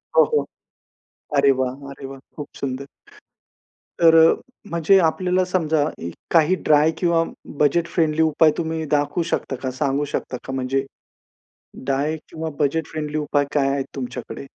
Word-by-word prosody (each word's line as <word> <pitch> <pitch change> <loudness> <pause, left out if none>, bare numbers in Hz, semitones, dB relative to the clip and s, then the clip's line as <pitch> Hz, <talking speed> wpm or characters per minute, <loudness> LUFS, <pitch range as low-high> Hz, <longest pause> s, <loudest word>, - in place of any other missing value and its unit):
हो, - - +8
हो. 455 -2 0 0.9
अरे 140 0 +5
वाह! 130 -1 +1 0.2
अरे 140 0 -10
वाह! 135 0 -8 0.2
खूप 145 -2 -6
सुंदर. 135 0 -4 1.2
तर 165 -1 +7 0.6
म्हणजे 170 +3 +4
आपल्याला 185 +2 0
समजा 160 -4 +2 0.5
काही 165 +2 +4
ड्राय 150 +1 +5
किंवा 170 -2 +2 0.4
बजेट 165 +4 +3
फ्रेंडली 160 -2 +1
उपाय 160 0 +4
तुम्ही 160 -1 -2
दाखवू 145 +4 0
शकता 135 - -1
का? 130 - -1
सांगू 140 +1 +1
शकता 125 - -2
का? 130 - -5
म्हणजे 135 +1 -1 1.0
ड्राय 140 +4 0
किंवा 160 -1 -5
बजेट 155 +2 +1
फ्रेंडली 155 -1 -4
उपाय 145 -1 +1
काय 140 -2 +2
आहेत 135 -1 -1
तुमच्याकडे? 125 0 -6
150 Hz, 140 wpm, -22 LUFS, 140-165 Hz, 1.2 s, हो